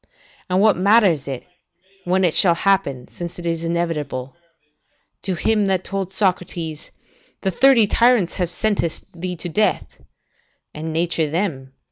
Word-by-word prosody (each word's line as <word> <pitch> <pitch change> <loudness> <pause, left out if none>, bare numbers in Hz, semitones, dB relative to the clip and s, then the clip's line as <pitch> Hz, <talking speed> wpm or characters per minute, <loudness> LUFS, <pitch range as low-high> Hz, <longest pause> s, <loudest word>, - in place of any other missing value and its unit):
And 185 +1 +2
what 215 -3 +4
matters 190 - +3
it, 135 -3 -5 0.6
when 185 +2 +1
it 170 -3 +2
shall 175 -3 +5
happen, 170 -10 0
since 175 -1 -8
it 175 - -8
is 165 -1 -2
inevitable? 155 -6 -3 0.9
To 190 - -2
him 210 +2 +1
that 190 -1 0
told 195 -1 -4
Socrates, 180 -5 -2 0.5
"The 190 - +1
thirty 255 +2 +5
tyrants 230 -3 +2
have 180 -3 -1
sentenced 185 -3 -2
thee 180 +1 -5
to 175 - -5
death"; 210 +6 -1 0.7
"And 160 +1 -5
nature 165 -1 0
them," 180 +5 0
said 135 0 -17
he. - - -46
175 Hz, 150 wpm, -21 LUFS, 160-195 Hz, 0.9 s, shall